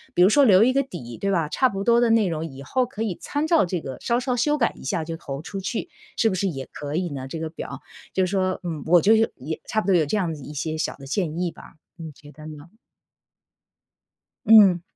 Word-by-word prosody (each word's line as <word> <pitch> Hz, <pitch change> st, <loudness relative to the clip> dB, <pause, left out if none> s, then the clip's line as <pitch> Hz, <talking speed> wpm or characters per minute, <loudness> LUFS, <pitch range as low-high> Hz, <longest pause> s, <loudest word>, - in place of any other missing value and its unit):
比 180 Hz, -, +5 dB
如 185 Hz, -, +6 dB
说 285 Hz, +6 st, +5 dB
留 205 Hz, -5 st, +6 dB
一 255 Hz, +2 st, +3 dB
个 275 Hz, -, +3 dB
底， 150 Hz, -, -8 dB
对 200 Hz, -, -1 dB
吧？ 165 Hz, -5 st, 0 dB
差 260 Hz, -, +2 dB
不 195 Hz, -2 st, -4 dB
多 235 Hz, +2 st, +4 dB
的 240 Hz, -, +3 dB
内 225 Hz, -3 st, +3 dB
容 165 Hz, -2 st, -3 dB
以 135 Hz, -2 st, -10 dB
后 255 Hz, -, 0 dB
可 225 Hz, -3 st, -5 dB
以 205 Hz, -6 st, -2 dB
参 290 Hz, +1 st, -2 dB
照 325 Hz, 0 st, +4 dB
这 180 Hz, 0 st, -2 dB
个 135 Hz, -4 st, -7 dB
稍 235 Hz, 0 st, +1 dB
稍 255 Hz, -1 st, -1 dB
修 295 Hz, +5 st, +1 dB
改 230 Hz, -, +1 dB
一 -, -, -13 dB
下 150 Hz, +5 st, -2 dB
就 165 Hz, +1 st, -5 dB
投 140 Hz, -4 st, -7 dB
出 195 Hz, -, -6 dB
去， 195 Hz, +4 st, -3 dB, 0.3 s
是 225 Hz, -, +3 dB
不 190 Hz, -, -2 dB
是 195 Hz, +2 st, 0 dB
也 135 Hz, -7 st, -5 dB
可 145 Hz, 0 st, -5 dB
以 175 Hz, +1 st, -1 dB
呢 135 Hz, -2 st, -6 dB
这 160 Hz, +4 st, -6 dB
个 160 Hz, 0 st, -4 dB
表。 140 Hz, -4 st, -7 dB, 0.3 s
就 190 Hz, -, +2 dB
是 180 Hz, -, -4 dB
说， 185 Hz, -2 st, 0 dB
嗯， 165 Hz, -4 st, -4 dB
我 175 Hz, +1 st, +6 dB
就 215 Hz, +5 st, +5 dB
是 220 Hz, -, +3 dB
说 -, -, -2 dB
也 150 Hz, +5 st, -6 dB
差 215 Hz, -, 0 dB
不 -, -, -9 dB
多 190 Hz, -, +4 dB
有 165 Hz, -, +4 dB
这 185 Hz, -, 0 dB
样 175 Hz, -5 st, -1 dB
子 150 Hz, -, -9 dB
的 -, -, -10 dB
一 150 Hz, -, -8 dB
些 155 Hz, +2 st, -3 dB
小 -, -, -2 dB
的 135 Hz, -, -13 dB
建 165 Hz, +2 st, -2 dB
议 175 Hz, -1 st, -1 dB
吧， -, -, -15 dB, 0.2 s
你 160 Hz, -2 st, -8 dB
觉 145 Hz, +1 st, -16 dB
得 155 Hz, 0 st, -12 dB
呢？ 155 Hz, +2 st, -11 dB, 1.7 s
嗯。 205 Hz, -5 st, +7 dB
180 Hz, 290 characters per minute, -23 LUFS, 155-220 Hz, 1.7 s, 嗯